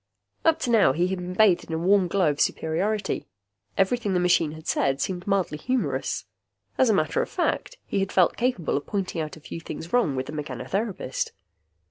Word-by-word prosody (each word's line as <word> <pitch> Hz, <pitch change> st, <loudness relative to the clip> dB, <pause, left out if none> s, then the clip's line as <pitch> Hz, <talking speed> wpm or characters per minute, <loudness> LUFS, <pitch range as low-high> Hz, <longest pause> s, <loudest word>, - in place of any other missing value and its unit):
Up 325 Hz, -1 st, +4 dB
to 245 Hz, -, 0 dB
now, 215 Hz, -, +5 dB
he 175 Hz, +5 st, +1 dB
had 190 Hz, -1 st, -2 dB
been 180 Hz, 0 st, -5 dB
bathed 200 Hz, -4 st, +4 dB
in 165 Hz, -, -6 dB
a -, -, 0 dB
warm 185 Hz, +2 st, +3 dB
glow 175 Hz, -3 st, +2 dB
of 145 Hz, -, -3 dB
superiority. 190 Hz, +6 st, 0 dB, 0.5 s
Everything 200 Hz, -1 st, +1 dB
the -, -, +3 dB
machine 165 Hz, -3 st, +2 dB
said -, -, 0 dB
had 135 Hz, 0 st, +1 dB
seemed 180 Hz, +3 st, -3 dB
mildly 190 Hz, -6 st, 0 dB
humorous. 155 Hz, -, -1 dB, 0.5 s
As 260 Hz, -, +4 dB
a -, -, +5 dB
matter 155 Hz, -, +1 dB
of -, -, -3 dB
fact, -, -, -1 dB
he 200 Hz, -, -1 dB
had 195 Hz, 0 st, -1 dB
felt 180 Hz, -2 st, +4 dB
capable 235 Hz, -, 0 dB
of 145 Hz, -, -6 dB
pointing 190 Hz, -5 st, -2 dB
out 155 Hz, 0 st, -5 dB
a -, -, -12 dB
few 160 Hz, -, -7 dB
things 165 Hz, +1 st, -7 dB
wrong 235 Hz, -, +3 dB
with 130 Hz, 0 st, -2 dB
the -, -, -7 dB
mechanotherapist. 180 Hz, -, -3 dB
180 Hz, 200 wpm, -25 LUFS, 155-205 Hz, 0.5 s, now